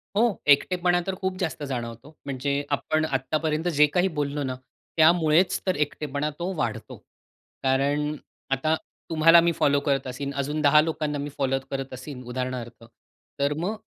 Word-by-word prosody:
हो, 225 -1 +2
एकटेपणा 175 +4 +4
तर 190 - -1
खूप 190 0 -2
जास्त 160 -5 -3
जाणवतो. 120 +1 -5 0.2
म्हणजे 140 0 -2 0.2
आपण 155 +2 0
आत्तापर्यंत 155 +4 -1
जे 150 - +8
काही 180 +2 +4
बोललो 145 0 -1
ना, 130 -1 -3 0.4
त्यामुळेच 160 +2 +4
तर 185 - +2
एकटेपणा 145 0 -4
तो 180 +2 -2
वाढतो. 120 -6 -3 0.7
कारण 145 +3 +1 0.4
आता 155 +4 +2 0.3
तुम्हाला 165 +1 +6
मी 170 0 +2
फॉलो 145 -2 +2
करत 135 -2 +1
असेन, 140 +2 -4
अजून 145 +3 -2
10 150 +1 +6
लोकांना 155 -2 -2
मी 145 +1 -4
फॉलो 135 -1 +1
करत 135 -1 -4
असेन, 130 0 -8
उदाहरणार्थ, 125 -2 -5 0.6
तर 140 +1 +2
मग 205 +5 -1
145 Hz, 150 wpm, -25 LUFS, 135-160 Hz, 0.7 s, जे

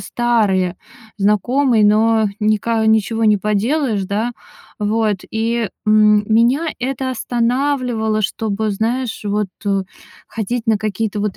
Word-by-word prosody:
старые 205 -7 0 0.4
знакомые, 220 +4 +2
но 220 +1 +3
ника 215 +1 +1
ничего 220 +1 +2
не 210 -1 +4
поделаешь, 215 +2 0
да. 215 +5 -2 0.5
Вот. 215 0 0
И, 225 0 -1 0.2
м, 210 -1 +5
меня 245 +9 +3
это 260 +1 -3
останавливало, 245 -2 -1
чтобы, 215 +1 -2
знаешь, 230 +4 -2
вот, 205 -1 -1 0.2
э, 195 -1 +1 0.5
ходить 225 +2 -4
на 220 -1 +3
какие-то 215 0 -2
вот 205 -1 -2
220 Hz, 115 wpm, -18 LUFS, 210-240 Hz, 0.5 s, м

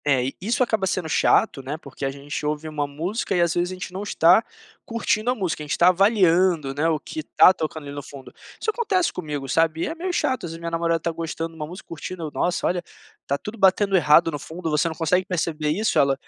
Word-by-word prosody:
É, 135 -3 +2
isso 230 +6 +1
acaba 220 -5 0
sendo 180 -2 -1
chato, 145 -2 +2
né, 140 +4 -5
porque 140 -3 -11
a - - 0
gente 140 +2 -6
ouve 150 +1 -2
uma 150 -2 -2
música 175 +9 -3
e, 175 - +3
às 170 -1 +2
vezes, 175 0 0
a - - -4
gente 180 0 -7
não 190 - -4
está 185 0 +4 0.4
curtindo 230 0 -1
a 250 - +2
música, 185 -8 -2
a - - -9
gente 150 - -1
tá 175 - +6
avaliando, 180 -6 +3
né, 150 +4 +1
o 155 -2 0
que 315 - -6
tá 190 - +5
tocando 155 -3 -4
ali 140 - -8
no 145 - -4
fundo. 140 -1 -12 0.3
Isso 440 - 0
acontece 405 -6 0
comigo, 150 -5 -5
sabe. 160 +3 +1
É - - -3
meio 355 +3 -3
chato, 260 - -1
às 165 - -6
vezes - - -7
a - - -13
minha 170 0 -5
namorada 165 0 +1
tá 170 +1 -2
gostando 165 0 -4
de - - -16
uma 155 -1 -5
música, 180 +3 -11
curtindo: 165 0 -6
"Nossa, 175 0 0
olha, 175 0 0 0.4
tá 140 - 0
tudo 210 +8 -8
batendo 195 +1 +4
errado 165 0 +5
no 145 - -4
fundo. 160 +3 -5
Você 150 +2 +2
não 160 - -4
consegue 170 +4 +1
perceber 165 -4 -2
isso?" 210 +8 +1
Ela: 140 -1 +4
165 Hz, 245 wpm, -23 LUFS, 150-190 Hz, 0.4 s, tá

